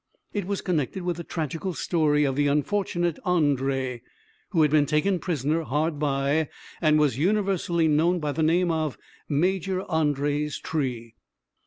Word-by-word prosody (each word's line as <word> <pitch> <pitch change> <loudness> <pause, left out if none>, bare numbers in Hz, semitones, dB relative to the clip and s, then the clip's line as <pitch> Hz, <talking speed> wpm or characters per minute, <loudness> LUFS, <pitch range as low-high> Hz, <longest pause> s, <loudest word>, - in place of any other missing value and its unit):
It 200 -4 -2
was 200 -1 -2
connected 175 +1 -1
with 175 -2 -2
the 170 - -5
tragical 165 +3 -4
story 150 -3 +2
of 135 -2 0
the 145 +1 +2
unfortunate 175 +2 0
André, 135 - 0 0.5
who 165 -5 +3
had 150 - +3
been 150 -2 +4
taken 175 +5 +1
prisoner 160 -1 -1
hard 150 0 -1
by; 145 +1 +1 0.3
and 155 -2 +4
was 145 -4 +2
universally 185 -2 +1
known 165 +4 +3
by 150 -2 -2
the 150 +3 -2
name 170 +2 +3
of 155 -3 -1 0.3
Major 185 +4 0
André's 150 -3 0
tree. 125 -7 -3
155 Hz, 150 wpm, -25 LUFS, 145-175 Hz, 0.5 s, been